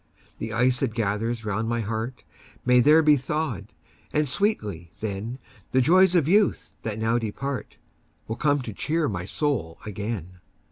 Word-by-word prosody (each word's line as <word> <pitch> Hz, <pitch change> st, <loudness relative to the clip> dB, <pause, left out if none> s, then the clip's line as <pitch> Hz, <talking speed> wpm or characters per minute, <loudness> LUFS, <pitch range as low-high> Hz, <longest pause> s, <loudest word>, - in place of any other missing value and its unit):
The 110 Hz, -, -4 dB
ice 125 Hz, +2 st, +2 dB
that 120 Hz, -5 st, -1 dB
gathers 110 Hz, +1 st, -1 dB
round 110 Hz, +2 st, -1 dB
my 115 Hz, 0 st, 0 dB
heart 110 Hz, +4 st, -4 dB, 0.4 s
May 125 Hz, 0 st, +6 dB
there 150 Hz, +6 st, +6 dB
be 150 Hz, -1 st, +6 dB
thawed; 130 Hz, -7 st, -2 dB, 0.4 s
and 150 Hz, 0 st, +1 dB
sweetly, 105 Hz, -, -1 dB
then, 110 Hz, +3 st, -4 dB, 0.4 s
The 130 Hz, -, +5 dB
joys 185 Hz, +6 st, +5 dB
of 160 Hz, -5 st, +3 dB
youth, 200 Hz, +3 st, +2 dB
that 110 Hz, -2 st, -4 dB
now 115 Hz, +2 st, +1 dB
depart, 125 Hz, +5 st, -4 dB, 0.5 s
Will 110 Hz, -, -3 dB
come 145 Hz, -2 st, +2 dB
to 110 Hz, -, -6 dB
cheer 155 Hz, +7 st, 0 dB
my 90 Hz, -4 st, -3 dB
soul 105 Hz, -, -1 dB
again. 100 Hz, -4 st, -5 dB
120 Hz, 155 wpm, -25 LUFS, 105-145 Hz, 0.5 s, May